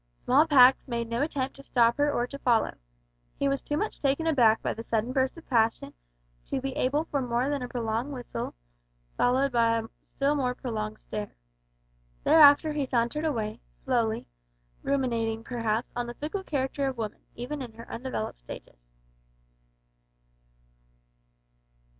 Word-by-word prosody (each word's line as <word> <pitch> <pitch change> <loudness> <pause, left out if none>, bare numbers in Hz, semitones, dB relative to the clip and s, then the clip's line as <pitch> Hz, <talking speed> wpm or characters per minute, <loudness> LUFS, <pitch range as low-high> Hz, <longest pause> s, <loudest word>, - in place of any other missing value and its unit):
Small 290 +6 +3
Pax 265 -3 +6
made 235 -2 -2
no 235 +2 -1
attempt 275 -3 -2
to 275 - -12
stop 235 -3 +3
her 290 0 +3
or 240 -4 0
to 280 +2 -9
follow. 235 -4 +2 0.6
He 280 - +1
was 275 0 0
too 295 - -2
much 425 - -3
taken 280 +3 +1
aback 240 -8 +4
by - - 0
the 225 - -7
sudden 230 +2 -1
burst 265 +3 +1
of 330 - -13
passion 225 -2 +1 0.5
to - - -1
be 265 0 -4
able 285 +5 +1
for 285 -4 -1
more 245 +2 0
than 285 -2 -1
a 250 - -3
prolonged 235 +2 -2
whistle, 250 - -5 0.6
followed 265 +3 +2
by 230 -1 +3
a 225 - -2 0.3
still 280 +1 +2
more 255 -4 0
prolonged 215 -4 -4
stare. 210 -1 -6 0.9
Thereafter 300 0 +7
he 290 -3 -1
sauntered 245 +5 0
away 225 -6 -2
slowly, 235 -4 -1 0.5
ruminating, 230 -5 -1
perhaps, 230 -1 -2
on 245 0 -2
the 240 - -7
fickle 315 +9 -4
character 275 -3 -1
of 265 -2 -3
woman, 220 -2 -5
even 265 +5 -5
in 240 -3 -7
her 230 +1 -11
undeveloped 230 - -4
stages. - - -12
250 Hz, 155 wpm, -28 LUFS, 230-280 Hz, 0.9 s, Thereafter